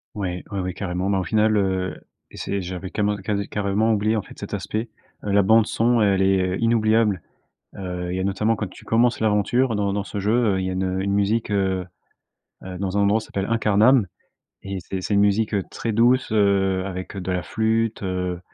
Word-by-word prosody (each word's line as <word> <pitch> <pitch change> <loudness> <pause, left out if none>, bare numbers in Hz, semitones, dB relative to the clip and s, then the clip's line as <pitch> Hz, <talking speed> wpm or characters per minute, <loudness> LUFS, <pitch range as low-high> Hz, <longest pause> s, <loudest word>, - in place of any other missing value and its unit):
Ouais, 90 -4 -3
ouais, 100 - -2
ouais, 90 -1 -3
carrément. 90 0 -3
Ben 100 -1 +2
au - - -1
final, 110 +4 +2
heu, 95 -2 0 0.4
et - - -12
c'est 100 - -3
j'avais 90 +1 -6
cament 105 0 0
ca 100 - -9
cade 100 0 -2
carrément 105 +2 +1
oublié 110 +1 +1
en - - 0
fait - - -15
cet - - -8
aspect. 110 +2 -3 0.3
Heu, 105 - -2
la 100 0 +5
bande 110 +3 +5
son, 120 0 +2
elle 100 -2 +3
est, 95 0 +3
heu, - - -3
inoubliable. 110 -4 +2 0.6
Heu, 90 -2 -4
il - - -2
y - - -2
a - - -1
notamment 105 +3 +1
quand 105 -1 -3
tu - - -15
commences 115 +1 +2
l'aventure 110 +3 +2
dans 100 -1 0
dans 100 -1 -2
ce 100 - -5
jeu, 105 +2 +1 0.2
heu, - - -1
il 95 - -2
y - - -1
a - - -3
une 95 0 -1
une 100 +1 0
musique, 105 +3 +1
heu, 95 -2 0 0.8
heu, 95 -1 -7
dans 95 +1 -2
un - - +3
endroit 100 +2 +3
s'appelle 100 -3 -4
Incarnam 110 +1 +4 0.5
et 100 0 -5
c'est 95 +1 -5
c'est 100 - -1
une - - +4
musique, 105 +1 +2
heu, 100 - 0
très 115 - -3
douce, 120 +3 +3
heu, 100 -3 +2
avec, 95 -1 -6
heu, 95 - -4
de 90 +1 -3
la 90 -1 -1
flûte, 110 +2 -1
heu, 90 -2 -2
100 Hz, 225 wpm, -23 LUFS, 95-110 Hz, 0.8 s, la